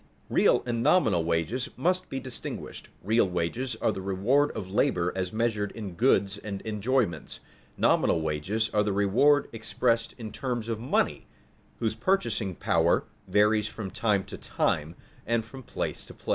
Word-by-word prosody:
Real - - +4
and 120 -1 -1
nominal 115 - +3
wages 85 - -1
must 185 +2 0
be 135 - -3
distinguished: 130 -2 -6
real 110 0 +3
wages 90 +9 -2
are - - +3
the 95 - -5
reward 105 +10 +2
of 95 - -4
labor 90 -3 +1
as 95 -1 -2
measured 110 -2 0
in 105 -5 -6
goods 100 -1 +2
and 100 -2 -5
enjoyments; 110 -1 -1 0.4
nominal - - +3
wages 80 +9 -1
are 105 - +3
the 105 -1 0
reward 115 +9 +4
expressed 115 +1 0
in 110 -3 -7
terms 115 0 -3
of 115 -2 -2
money, 120 - 0 0.5
whose 110 -2 0
purchasing 110 - 0
power 85 +1 +2 0.2
varies 105 +2 +3
from 110 -3 -6
time 105 -4 +1
to 100 - -9
time 80 +2 -1 0.3
and 115 -1 +1
from 130 +4 -10
place - - -4
to - - -11
place. - - -11
110 Hz, 160 wpm, -28 LUFS, 95-120 Hz, 0.5 s, Real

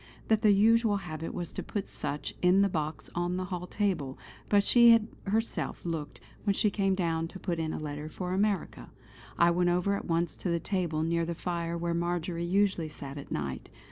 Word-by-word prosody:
that 220 -1 +4
the 210 - +6
usual 220 +1 +4
habit 165 -4 -5
was 175 -2 -5
to - - -4
put 205 -2 -4
such 145 - -4
in 185 +2 +5
the - - +4
box 155 -4 -3
on 175 +1 -1
the 185 - -2
hall 180 -1 -5
table, 180 -11 -1 0.3
but 205 -1 +5
she 235 +2 +7
had 230 -2 +6 0.2
herself, 220 -1 -1
looked, 165 -3 -4 0.2
when 200 -2 +1
she 210 - +2
came 195 -1 +1
down 165 -3 0
to 190 - -10
put 175 -3 -3
in 160 -1 -1
a - - -3
letter 150 0 -5
for 180 +3 -4
America. 195 - -1 0.5
I 170 0 +5
went 175 +1 +2
over 180 +3 +1
at - - -5
once 170 0 0
to 185 - -3
the 170 0 +1
table 170 -4 -1
near 170 +1 +1
the 170 0 -3
fire 170 -1 -3
where 170 0 -1
Marjory 170 0 -1
usually 190 -3 +1
sat 140 -1 -8
at 140 - -10
night. 70 -3 -4
175 Hz, 205 wpm, -30 LUFS, 165-195 Hz, 0.5 s, she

